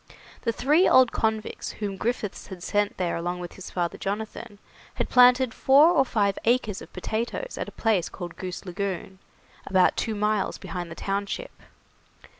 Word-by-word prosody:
The 230 - 0
three 300 +10 +3
old 255 -2 +6
convicts 220 -1 -2
whom 205 -2 -4
Griffiths 215 0 -3
had 180 -2 -9
sent 205 +1 0
there 180 -2 -1
along 175 +1 -3
with 175 -1 -7
his 190 - -9
father 175 -2 -2
Jonathan, 205 +1 -5 0.4
had - - -2
planted 250 -1 +6
four 285 +5 +6
or 300 -6 +4
five 205 -6 0
acres 230 -3 +1
of - - -12
potatoes 235 - -3
at - - -4
a - - -20
place 210 -7 +1
called 175 -2 -8
Goose 185 0 -6
Lagoon, 190 0 -4 0.5
about 185 -1 +4
two 225 -2 -2
miles 210 -1 0
behind 175 -2 -6
the 165 - -8
township. 200 - -3
205 Hz, 165 wpm, -26 LUFS, 185-235 Hz, 0.5 s, old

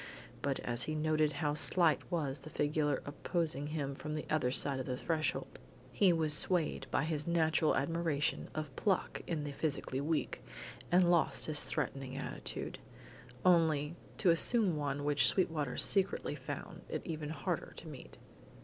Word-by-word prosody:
But 140 -1 -1
as 120 0 0
he 155 - -1
noted 155 0 +2
how 145 +1 -1
slight 165 +1 +3
was 145 -5 -1
the 140 +4 -11
figure 150 -1 0
opposing 145 0 -2
him 145 -3 -3
from 150 +2 -5
the 155 - -4
other 150 -5 +2
side 135 +1 +3
of 130 - -4
the 125 -1 -2
threshold, 155 +2 -2 0.3
he 195 -3 +4
was 160 -3 +2
swayed 160 -4 +1
by 135 - +1
his 155 -1 -2
natural 160 -2 +2
admiration 160 -1 0
of 155 -4 -4
pluck 195 -3 0
in 160 -4 -2
the 145 - -4
physically 140 -2 -2
weak, 155 +2 -2 0.5
and 175 0 +5
lost 170 -2 +3
his 150 -1 0
threatening 135 -1 -3
attitude, 140 - -5 0.7
only 160 -3 +3 0.2
to 185 - +4
assume 190 +2 +3
one 145 -1 -2
which 145 0 +4
Sweetwater 155 -8 0
secretly 195 -1 +3
found - - -7
it - - -3
even 155 -3 -4
harder 160 +3 -3
to 165 - -9
meet. 145 -5 -10
155 Hz, 160 wpm, -34 LUFS, 145-165 Hz, 0.7 s, and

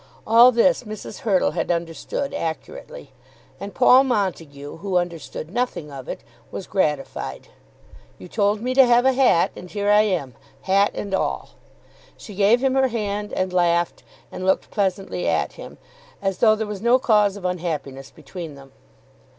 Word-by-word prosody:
All 235 +3 +7
this 250 +3 +3
Mrs. 215 -3 -8
Hurtle 205 -8 +1
had - - -3
understood 170 - -3
accurately; 480 - -6 0.5
and 200 0 -8
Paul 255 +1 +6
Montague, 165 - -3
who 190 +1 -1
understood 170 -1 -4
nothing 240 -11 -2
of 135 -2 -9
it, - - -5 0.3
was 190 - -7
gratified. 150 -8 -2 0.7
"You - - -11
told 205 +2 0
me 250 +2 -1
to 265 +1 +7
have 245 0 +4
a 265 - +4
hat, 250 -10 +3
and 180 - -10
here 205 +1 0
I 210 0 +6
am, 175 - -1 0.3
hat 200 +2 +3
and 200 -1 -5
all." 190 - -2 0.7
She 210 - -11
gave 210 +6 +3
him 265 -1 +2
her 265 0 +3
hand, 210 -3 -3
and 185 -1 -2
laughed, 175 -1 +1 0.3
and - - -7
looked 190 0 0
pleasantly 195 -2 -2
at - - 0
him, - - -11 0.4
as 195 -1 -2
though 215 -2 +5
there 220 0 -3
was 210 -2 -6
no 240 +2 +4
cause 210 -6 +2
of 190 - -9
unhappiness 160 -7 -4
between 170 -6 -9
them. 135 -1 -15
200 Hz, 165 wpm, -22 LUFS, 175-235 Hz, 0.7 s, All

